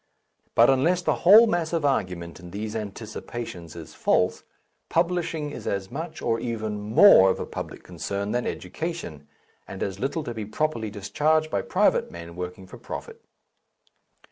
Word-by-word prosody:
But 120 +3 +7
unless 170 +7 +2
the - - +2
whole 210 +6 +9
mass 175 -6 -1
of 165 -3 0
argument 90 -11 -1
in 90 - -11
these 105 +4 -5
Anticipations 105 -4 -6
is 80 -2 -9
false, - - +1 0.5
publishing 165 -3 0
is - - -8
as 100 -1 -2
much, 160 +1 -6
or 115 -1 +1
even 110 -3 -3
more, 105 - +7
of - - 0
a - - -3
public - - -7
concern 100 +1 -4
than 120 0 -1
education, 90 - -5 0.4
and 95 - -5
as 95 -1 -4
little 140 +5 -2
to 120 - -5
be 110 -2 -5
properly 115 -1 -1
discharged 155 +10 0
by 100 - 0
private - - +2
men 85 0 -9
working 90 +1 -6
for - - -12
profit. - - -8
115 Hz, 160 wpm, -25 LUFS, 95-155 Hz, 0.5 s, whole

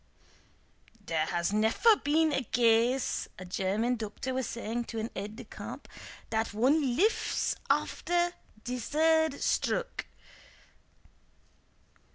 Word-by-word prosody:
"Dere 160 -2 0
has 175 +2 -1
neffer 220 - +4
been 310 +1 +3
a 270 - +1
gase," 240 +2 +2
a 185 - -8
German 200 +7 0
doctor 225 +4 -4
was 260 -1 -1
saying 235 +1 -3
to 230 - -7
an 220 +1 -3
aide 205 +2 -5
de 245 - -8
camp, - - -9 0.4
"dat 220 -1 -1
one 260 +2 +3
liffs 420 - +1 0.2
after 350 0 +1 0.3
de 250 +1 -3
sird 315 +4 +2
stroke." - - -1
240 Hz, 115 wpm, -30 LUFS, 215-290 Hz, 0.4 s, neffer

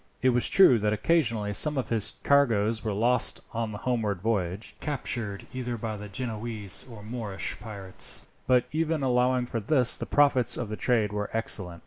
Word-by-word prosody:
It 130 - +4
was 125 -1 +2
true 130 -12 +6
that 105 0 0
occasionally 115 -7 0
some 150 +8 +3
of 130 - -3
his 110 -3 -1
cargoes 115 -6 +2
were 110 - -2
lost 115 +4 +1
on 115 -1 -2
the 105 - -7
homeward 110 -5 -2
voyage, 100 -1 -3
captured 120 -8 -1
either 125 -2 -4
by 110 -1 -5
the 105 0 -9
Genoese 110 -3 0
or 110 -3 -11
the - - -12
Moorish 110 -5 -1
pirates; 100 -4 -2 0.2
but 125 -1 +3
even 160 -1 -1
allowing 125 0 +1
for 120 -1 -4
this, 125 +2 +4
the - - -6
profits 140 -4 +2
of 120 -4 -4
the 110 - -4
trade 110 -3 0
were 105 0 -3
excellent. 95 -6 -3
115 Hz, 180 wpm, -26 LUFS, 105-125 Hz, 0.2 s, true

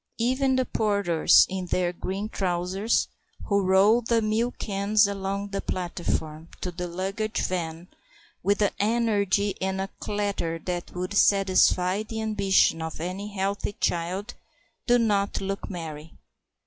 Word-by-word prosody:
Even 260 +3 +1
the 260 0 +1
porters 200 -9 +4
in 190 -1 -4
their 175 0 0
green 190 +4 -4
trousers, 190 +2 0 0.4
who 200 -1 +2
roll 195 +5 +4
the 230 0 +1
milk 225 +3 0
cans 205 +1 +2
along 200 0 -3
the 195 0 -3
platform 165 -3 -3
to 180 - -4
the 175 +1 -5
luggage 195 +5 -2
van 170 -1 -3 0.5
with 205 +3 +2
an 205 - +2
energy 205 -2 +1
and 190 0 -1
a 195 +1 -3
clatter 200 -5 -2
that 175 +1 -5
would 180 +2 -3
satisfy 190 -1 +3
the 220 +1 -6
ambition 200 -6 +2
of 160 -1 -5
any 185 +5 -4
healthy 200 0 -2
child, 185 +6 -2 0.5
do 245 0 +5
not 205 -4 +1
look 195 +1 -4
merry. 160 -4 -7
195 Hz, 135 wpm, -26 LUFS, 180-210 Hz, 0.5 s, do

